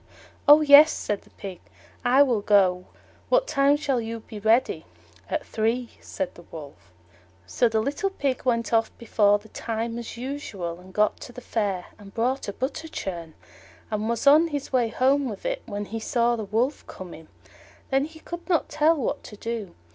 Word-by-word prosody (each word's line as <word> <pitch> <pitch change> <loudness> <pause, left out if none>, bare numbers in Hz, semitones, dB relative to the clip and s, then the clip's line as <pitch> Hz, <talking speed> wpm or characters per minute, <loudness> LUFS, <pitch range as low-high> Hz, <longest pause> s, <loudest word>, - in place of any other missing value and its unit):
"Oh, 295 +1 +9
yes," 300 +1 +8
said 205 -1 -3
the - - -22
Pig, 190 -3 -9 0.4
"I 260 +3 +6
will 240 -6 +1
go; 190 -3 +3 0.4
what - - +4
time 280 - +3
shall 275 -5 0
you 225 0 -5
be 215 -1 -9
ready?" 220 -6 +2 0.5
"At - - -2
three," 230 +2 -1
said 190 - -4
the - - -14
Wolf. 145 - -12 0.5
So 240 - +1
the 220 -1 +1
little 285 - -1
Pig 280 -9 -2
went 230 -2 0
off 225 0 +3
before 205 -3 +3
the 210 +1 -17
time, 230 +1 -4
as 235 - -8
usual, 220 -10 -5
and 185 +1 -14
got 210 +2 +1
to - - -9
the 250 - -9
Fair, 200 -7 -2
and 200 -1 -14
bought 255 +4 0
a 200 - -3
butter 270 +7 -4
churn, 170 - -6 0.6
and 215 +1 -1
was 235 +1 -2
on 305 +4 +7
his 285 -4 -5
way 245 -3 +3
home 265 +3 +2
with 205 -3 -8
it - - -2
when 205 -2 -4
he 225 +3 -5
saw 235 +1 +1
the 220 -2 -5
Wolf 230 +8 -1
coming. 170 -4 -10 0.6
Then 270 +1 +2
he 315 +1 -13
could 345 +2 -8
not 340 -3 +1
tell 305 +2 +3
what 275 - -2
to 210 - -10
do. 225 -4 -5
230 Hz, 185 wpm, -25 LUFS, 205-275 Hz, 0.6 s, Oh